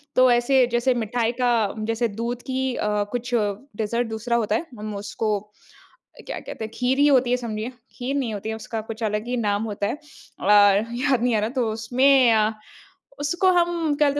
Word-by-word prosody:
तो 255 0 +6
ऐसे 245 +2 +4
जैसे 240 +2 +2
मिठाई 235 0 -1
का 245 - +3 0.4
जैसे 230 +1 +1
दूध 240 +1 -3
की 260 0 -1
अ, 210 -1 0
कुछ 245 0 -4
डेज़र्ट 220 +2 -2
दूसरा 225 +2 -2
होता 210 +1 0
है। 320 - -2
हम 215 -1 -5
उसको 205 +1 -2
अ, 210 +1 -25 0.6
क्या - - -5
कहते - - -8
हैं, 220 - -9
खीर 250 +2 +1
ही 290 - +6
होती 255 -3 +4
है 250 - +3
समझिए। 215 +2 -3 0.3
खीर 260 +3 -2
नहीं 255 -6 -1
होती 210 +1 -5
है, 220 - -2
उसका 225 0 -5
कुछ 225 +1 -6
अलग 210 0 -1
ही 245 0 -1
नाम 205 -2 0
होता 200 0 -2
है। - - -2
अ, 300 -8 -9
याद 225 +6 +4
नहीं 245 -2 +2
आ - - +2
रहा। 215 +2 -1
तो 225 - 0
उसमें 250 +3 +4
अ, 215 0 +3 0.7
उसको 350 +6 +1
हम 345 -1 +3 0.2
क्या 295 0 +3
बोलते 285 +1 -1
235 Hz, 205 wpm, -23 LUFS, 215-255 Hz, 0.7 s, तो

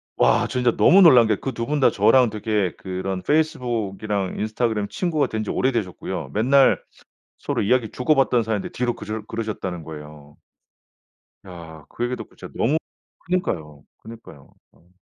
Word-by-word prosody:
와. - - +3
진짜 125 -1 +1
너무 195 +3 +6
놀란 125 -10 +7
게 110 - +2
그 135 - -5
2 115 0 -3
분 150 0 0
다 135 - +4
저랑 130 -3 +4
되게 105 -3 -1
그런 95 0 -4
페이스북이랑 110 -8 -1
인스타그램 110 -1 -1
친구가 160 - -1
된 110 -1 -3
지 105 - -7
오래되셨고요. 115 -8 -2
맨날 130 +6 +4 0.6
서로 - - -2
이야기 115 +2 +1
주고받던 125 -2 +2
사이인데 110 -3 -3
뒤로 120 -1 -2
그러 110 +1 -6
그러셨다는 95 -7 -5
거예요. 75 -1 -11 1.1
야. 80 -4 -11
그 - - -5
얘기 125 +1 -2
듣고 - - -11
진짜 - - -11
너무 145 +7 +2 0.5
그니까요, 80 - -3
그니까요. 110 -11 -14 0.2
어. 85 - -27
110 Hz, 340 characters per minute, -22 LUFS, 95-125 Hz, 1.1 s, 놀란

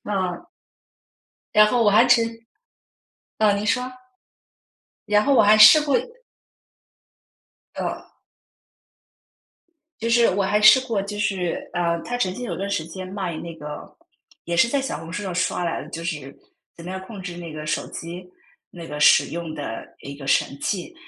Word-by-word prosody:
啊。 185 -4 -3 1.1
然 210 0 +7
后 235 +1 +2
我 205 - +5
还 215 +4 +5
曾 240 -1 +4 1.1
嗯， 205 -2 +3
您 210 - -3
说。 250 +4 0 1.1
然 210 0 +3
后 280 - +2
我 - - +6
还 210 +1 +6
试 220 +9 +9
过 285 -3 +2 1.8
呃。 - - -5 1.9
就 230 - -1
是 235 -3 +4
我 195 +1 0
还 205 +2 +1
试 215 +5 +8
过， 220 -4 -1
就 205 +1 -5
是， 190 -4 -2
呃， 170 -1 -1
他 245 0 -4
曾 185 -6 -1
经 250 - -7
有 - - -4
段 195 +1 -3
时 200 -5 -2
间 185 +2 -8
卖 185 -4 -4
那 170 -1 -7
个 150 -2 -9 0.5
也 170 0 -2
是 230 - +5
在 275 +2 0
小 265 - -4
红 165 +1 -9
书 205 - -4
上 190 -3 -5
刷 180 0 -1
来 170 - -2
的， - - -12
就 165 0 -7
是 150 -5 -5 0.4
怎 170 - -12
么 180 - -8
样 190 0 -5
控 190 +1 -10
制 175 -1 -7
那 165 -3 -8
个 155 0 -7
手 - - -2
机 175 +2 -8 0.4
那 170 -2 -10
个 150 0 -6
使 - - +6
用 170 -2 -6
的 115 -7 -7
一 140 0 -8
个 140 - -10
神 140 +1 0
器。 200 - -3
190 Hz, 185 characters per minute, -22 LUFS, 170-215 Hz, 1.9 s, 试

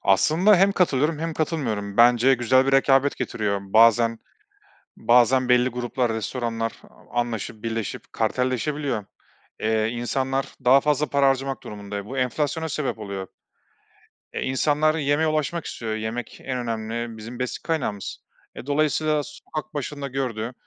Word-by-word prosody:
Aslında 155 - +4
hem 195 +2 +4
katılıyorum 155 -4 +1
hem 165 0 -3
katılmıyorum. 110 -11 -2
Bence 120 +2 +6
güzel 130 +2 +3
bir 135 - +1
rekabet 135 +1 +4
getiriyor. 105 -5 -2
Bazen 115 +3 +4 0.8
bazen 125 +2 +4
belli 125 0 +4
gruplar, 120 -1 -1
restoranlar 115 +1 -2 0.2
a 120 - -4
anlaşıp, 115 -2 -4
birleşip 115 -2 -4
kartelleşebiliyor. 130 -1 -1 0.6
Eee, 110 0 +1
insanlar 130 +3 -1 0.2
daha 130 +2 +7
fazla 150 +1 +1
para 140 -1 +3
harcamak 135 -2 -1
durumunda, 105 -1 -7
e, 100 - -4
bu 135 +2 -5
enflasyona 150 +5 -1
sebep 145 -5 -2
oluyor. 100 -3 -5 1.1
E, - - -3
insanlar 150 +4 +2
yemeğe 150 +1 +1
ulaşmak 155 +2 -1
istiyor, 110 -2 -4
yemek 110 +2 -5
en 130 -1 -3
önemli 115 -1 -4
bizim 115 +3 -9
besin 125 -1 -4
kaynağımız. 135 - -3 0.4
E, - - -8
dolayısıyla 150 +1 +1
sokak 155 +2 -8
başında 145 0 -4
gördüğü 125 -3 -3
125 Hz, 135 wpm, -24 LUFS, 115-145 Hz, 1.1 s, daha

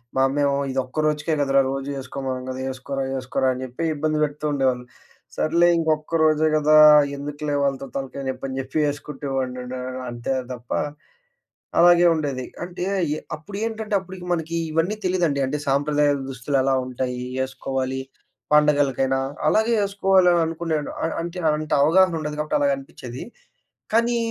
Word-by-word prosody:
మా 130 - +3
అమ్మేమో 140 0 +1
"ఇదొక్క 130 +3 -2
రోజుకే 150 +1 0
కదరా! 135 0 +4
రోజు 135 +1 -4
యేసుకోమనం 130 -1 -4
గదా! 130 - -5
యేసుకోరా 135 +1 -4
యేసుకోరా" 130 0 0
అని 130 - -6
జెప్పి 130 +6 -4
ఇబ్బంది 155 +1 0
పెడుతుండేవాళ్ళు. 140 -4 0 0.5
సర్లే 170 +2 +3
ఇంకొక్క 160 0 0
రోజే 155 0 +3
గదా! 155 0 +5 0.4
ఎందుకులే 145 +1 -3
వాళ్ళతో 135 -1 -1
తలకాయ 135 0 -5
నెప్పి 130 +1 -5
అని 130 - -5
జెప్పి 135 +3 0
ఎసుకుంటే 145 -1 -7
వాడినండి 125 -1 -3
ఆహ్, 130 0 -5
అంతే 120 +2 -3 0.2
తప్ప 120 -1 -12 1.1
అలాగే 175 0 +6
ఉండేది. 140 -5 -2 0.2
అంటే 175 0 -5 0.3
ఎ - - -5 0.2
అప్పుడేంటంటే 215 +5 -4
అప్పుడుకి 185 -1 -10
మనకీ 165 0 -2 0.2
ఇవన్నీ 165 +7 +1
తెలీదండి. 175 -6 +1
అంటే 150 +3 -2
సాంప్రదాయ 145 +1 +2 0.2
దుస్తులు 135 +2 -2
ఎలా 135 0 +2
ఉంటాయి? 125 0 -3 0.2
యేసుకోవాలి. 130 0 -2 0.5
పండగలకైనా 145 -3 +3 0.3
అలాగే 220 +2 +3
యేసుకోవాలి 195 -2 +3
అని 170 - +3
అనుకునేను 160 -2 -2
అ - - +2
అంటే 170 +2 -5 0.2
అంత 155 0 -6
అవగాహన 170 +3 +4
ఉండదు 150 -1 -4
గాబట్టి 150 0 0
అలాగనిపిచ్చేది. 135 -3 -3 0.7
కానీ 235 +1 +3
145 Hz, 140 wpm, -23 LUFS, 130-165 Hz, 1.1 s, అలాగే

